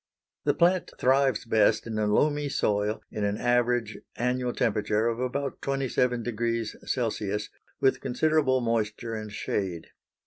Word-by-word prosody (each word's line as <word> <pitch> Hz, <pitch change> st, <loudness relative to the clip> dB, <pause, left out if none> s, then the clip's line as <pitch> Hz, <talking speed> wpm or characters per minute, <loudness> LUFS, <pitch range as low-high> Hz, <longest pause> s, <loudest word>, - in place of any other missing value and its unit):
The -, -, +2 dB
plant 180 Hz, +1 st, +2 dB
thrives 135 Hz, 0 st, +2 dB
best 110 Hz, -1 st, +3 dB
in 110 Hz, -2 st, -3 dB
a 105 Hz, -, +1 dB
loamy 145 Hz, +7 st, +2 dB
soil 105 Hz, -3 st, 0 dB
in 105 Hz, -, -3 dB
an 100 Hz, 0 st, 0 dB
average 120 Hz, -2 st, +1 dB, 0.2 s
annual 125 Hz, +2 st, 0 dB
temperature 105 Hz, -1 st, +1 dB
of 115 Hz, 0 st, -1 dB
about 135 Hz, +2 st, -3 dB
27 125 Hz, -3 st, 0 dB
degrees 115 Hz, -1 st, -2 dB
C., 105 Hz, -4 st, -1 dB, 0.4 s
with 135 Hz, -, +2 dB
considerable 135 Hz, 0 st, +2 dB
moisture 115 Hz, 0 st, -1 dB
and 110 Hz, -1 st, -5 dB
shade. 95 Hz, -4 st, -3 dB
120 Hz, 135 wpm, -27 LUFS, 110-130 Hz, 0.4 s, best